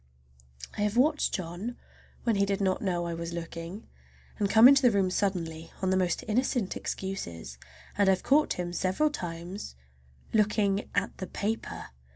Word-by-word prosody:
I - - 0
have 210 +2 0
watched 300 +4 +3
John 185 +6 -5 0.5
when 230 -4 +2
he 200 - +3
did 200 0 0
not 190 -2 +1
know 175 -3 -1
I 170 - -3
was 170 0 -5
looking, 170 +4 -6 0.5
and 200 -2 +1
come 220 +3 +9
into 275 0 +7
the 250 - +6
room 195 -4 +1
suddenly 165 -5 -2
on 190 -1 0
the - - +3
most 185 -2 0
innocent 235 -2 0
excuses, 85 - -5 0.4
and 200 -1 +5
I've 190 -1 +2
caught 300 +2 +3
him 175 -1 -4
several 190 +13 +1
times 175 - -6 0.6
looking 210 -2 +2
at 200 0 0
the 185 - -4
paper! 215 +3 -4
195 Hz, 165 wpm, -29 LUFS, 175-215 Hz, 0.6 s, come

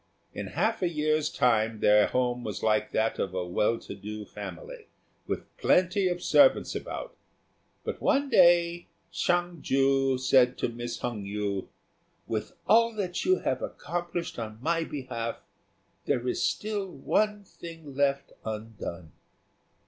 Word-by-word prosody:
In - - -5
half 225 +1 0
a 180 - +2
year's 155 -1 +1
time 115 -7 +2
their 105 0 +5
home 125 -1 0
was 105 -3 -5
like 110 -1 +2
that 110 +1 0
of 95 -1 -2
a 90 -1 -1
well 105 +6 +1
to - - -8
do 105 +2 -7
family, - - -9 0.4
with - - -5
plenty 185 +2 +3
of 175 -1 -2
servants 275 -2 +5
about; - - -6 0.7
but - - -5
one 280 +1 +2
day 175 -6 +4 0.2
Hsiang 175 -2 0
ju 135 0 +2
said 130 -1 +4
to - - -1
Miss 120 0 -5
Hung 120 -4 -3
yü, 100 -1 -3 0.6
"With 110 -1 -3
all 230 0 +5
that 185 -4 -2
you 370 0 +3
have - - -1
accomplished 175 - -4
on 110 -1 -5
my 165 +5 0
behalf, 120 -6 -4 0.7
there 125 +1 0
is - - -1
still 210 -2 -1
one 210 +8 0
thing 165 -6 -11
left 140 0 +1
undone." 105 -7 -6
135 Hz, 140 wpm, -28 LUFS, 110-175 Hz, 0.7 s, their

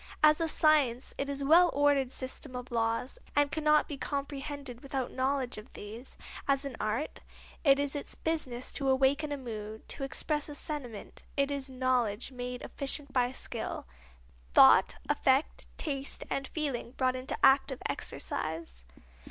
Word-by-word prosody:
As 305 +1 +6
a 330 - +2
science 295 -6 +3
it 275 - -1
is 280 0 -3
a - - -1
well 345 +4 +7
ordered 280 -2 +3
system 260 +1 -5
of 250 +1 -6
laws, 230 - -1 0.2
and 290 0 +3
cannot 305 -1 +3
be 290 - -5
comprehended 280 -3 -4
without 270 -2 -3
knowledge 260 -3 -1
of 210 - -14
these. 225 +5 -9 0.3
As 275 0 +2
an 275 -3 -5
art, 215 +8 -2 0.4
it 275 -3 +6
is 285 0 -1
its 285 - -4
business 265 -7 -2
to 275 -1 -1
awaken 275 +3 +3
a 285 - -1
mood, 220 -4 -7
to - - -3
express 295 +2 -1
a 295 - -6
sentiment; 265 -9 -6 0.2
it 280 0 +2
is 280 -1 -3
knowledge 250 -3 0
made 250 -1 -5
efficient 280 0 -2
by 250 -1 +2
skill - - -4 0.7
thought, - - +8
effect, 265 +3 +2
taste 280 -3 -2
and 270 -1 -1
feeling 275 -6 -3
brought 255 -1 +1
into 255 +1 -2
active 270 +1 +5
exercise. 160 - -4
270 Hz, 155 wpm, -31 LUFS, 250-285 Hz, 0.7 s, thought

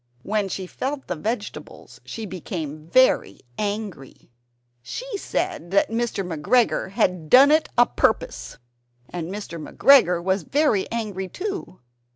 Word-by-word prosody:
When 205 -1 -1
she 190 0 -4
felt 270 +9 -4
the 180 - -3
vegetables 210 +6 -6
she 225 - -6
became 160 -5 -6
very 255 - +4
very - - -24 0.2
angry. 200 - -5 0.5
She - - -6
said 360 - -3
that 200 +3 +2
Mr. 230 -4 -1
McGregor 180 +7 +1
had 180 -6 0
"done 275 +3 +8
it 310 +1 +3
a 240 - +7
purpose." - - -1 0.5
And 170 -1 -5
Mr. 180 -6 -6
McGregor 180 - +5
was 190 +1 +1
very 260 - +1
angry 210 -5 -3
too. 390 - -6
205 Hz, 135 wpm, -23 LUFS, 180-250 Hz, 0.5 s, done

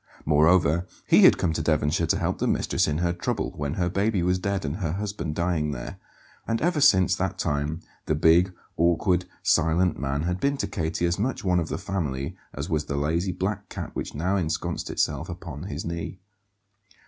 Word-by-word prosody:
Moreover, 80 +2 +4 0.2
he - - +6
had - - +7
come 80 - 0
to 80 - -1
Devonshire 75 +1 +1
to - - +2
help - - -1
the - - 0
mistress - - +1
in 75 0 0
her 85 +1 0
trouble, 85 - -2
when 75 +1 -3
her 90 -2 0
baby 100 +1 +1
was 90 +1 +1
dead 100 -1 -2
and 70 +4 -3
her 85 -6 -2
husband 100 -5 -3
dying 85 -4 0
there; - - -7 0.5
and 115 0 0
ever 170 -2 +1
since 95 -10 +5
that 95 +1 -2
time 75 +1 -1 0.3
the 80 - +2
big, 85 +4 +4 0.3
awkward, 85 +2 +2 0.2
silent 85 +1 +2
man 70 +2 -1
had 90 +2 -1
been 140 +4 +1
to - - -1
Katie 80 +2 -2
as 85 +2 0
much 125 +5 -1
"one 90 -2 +2
of 80 - -3
the - - -2
family" 70 -9 -3 0.2
as - - -5
was 75 -1 -1
the 70 - -3
lazy 85 +6 0
black 95 +2 -3
cat - - -6
which - - -4
now 90 +6 0
ensconced 80 -4 -2
itself - - -1
upon 85 -3 -7
his 80 -5 -5
knee. 85 +1 -4
85 Hz, 195 wpm, -26 LUFS, 75-95 Hz, 0.5 s, had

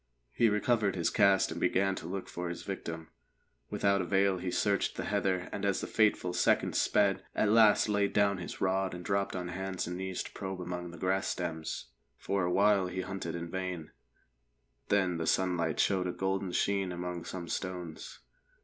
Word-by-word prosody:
He 115 - +4
recovered 105 -1 +1
his 85 -2 0
cast 100 -3 +4
and 85 +1 -5
began 95 +2 +2
to 85 - -6
look 95 +2 -4
for 90 0 -4
his 85 - -6
victim. 85 -4 -5 0.6
Without 100 -1 +2
avail 95 +1 +2
he 90 - -3
searched - - +1
the - - -3
heather, 95 -2 0
and 100 - -5
as 100 -2 +1
the - - -3
fateful 105 -5 +2
seconds - - +2
sped, 100 -2 +2
at 105 - +2
last 110 -1 +6
laid 100 -1 +1
down 100 -2 +2
his 85 - -7
rod 95 -1 0
and 90 -1 -8
dropped 100 0 0
on 90 -1 -3
hands 95 +1 -3
and 90 +1 -4
knees 95 0 -3
to - - -10
probe 95 -2 -5
among 90 0 -5
the 85 - -10
grass 95 +2 0
stems. 80 -3 -4 0.3
For 100 -1 -1
a 90 - 0
while 100 0 +4
he 95 +1 -3
hunted 95 -3 -4
in 85 0 -5
vain, 90 -3 -4 1.0
then 95 -4 +2
the 80 - -3
sunlight 90 -4 +1
showed 95 -2 +2
a - - -1
golden 95 0 -2
sheen 95 0 +1
among 90 -1 -4
some 90 -2 -6
stones. 90 -3 -5
95 Hz, 185 wpm, -31 LUFS, 90-100 Hz, 1.0 s, last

